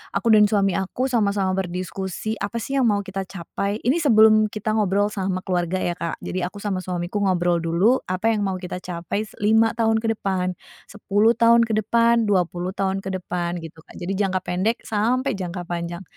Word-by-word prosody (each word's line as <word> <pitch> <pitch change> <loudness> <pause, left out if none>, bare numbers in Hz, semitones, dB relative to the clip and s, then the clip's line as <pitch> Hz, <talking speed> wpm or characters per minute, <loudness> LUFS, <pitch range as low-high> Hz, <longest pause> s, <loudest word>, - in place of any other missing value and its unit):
aku 230 - +2
dan 210 -1 +7
suami 200 -2 +2
aku 195 +7 -1
sama-sama 200 -5 +1
berdiskusi, 190 +3 -4
apa, 205 +3 -4
sih, 270 +5 -4
yang 250 - +3
mau 205 -2 +2
kita 195 0 -4
capai. 200 +3 -4
Ini 270 +8 +2
sebelum 220 -6 +5
kita 215 0 -3
ngobrol 205 -1 +2
sama 190 -2 -2
keluarga, 180 -2 -1
ya, 175 - 0
Kak. 170 -1 -4
Jadi 185 - -3
aku 180 +3 -4
sama 200 -3 -1
suamiku 180 +2 -3
ngobrol 175 -2 +2
dulu, 180 +10 +3
apa 190 +5 0
yang 215 - 0
mau 190 -1 -1
kita 180 0 -6
capai 175 +3 -3
s - - -17
5 220 +2 +4
tahun 225 -1 +2
ke 225 0 -1
depan, 185 -2 -1 0.4
10 210 +2 +2
tahun 235 0 +5
ke 220 - 0
depan, 235 +2 +3
20 180 -2 0
tahun 195 0 -1
ke 195 - -4
depan, 175 -1 -3
gitu, 165 0 -10
Kak. - - -17
Jadi 180 +2 -3
jangka 190 -2 +1
pendek 190 +7 -1
sampai 235 +4 0
jangka 180 -1 -5
panjang. 170 +1 -4
195 Hz, 195 wpm, -23 LUFS, 180-220 Hz, 0.4 s, dan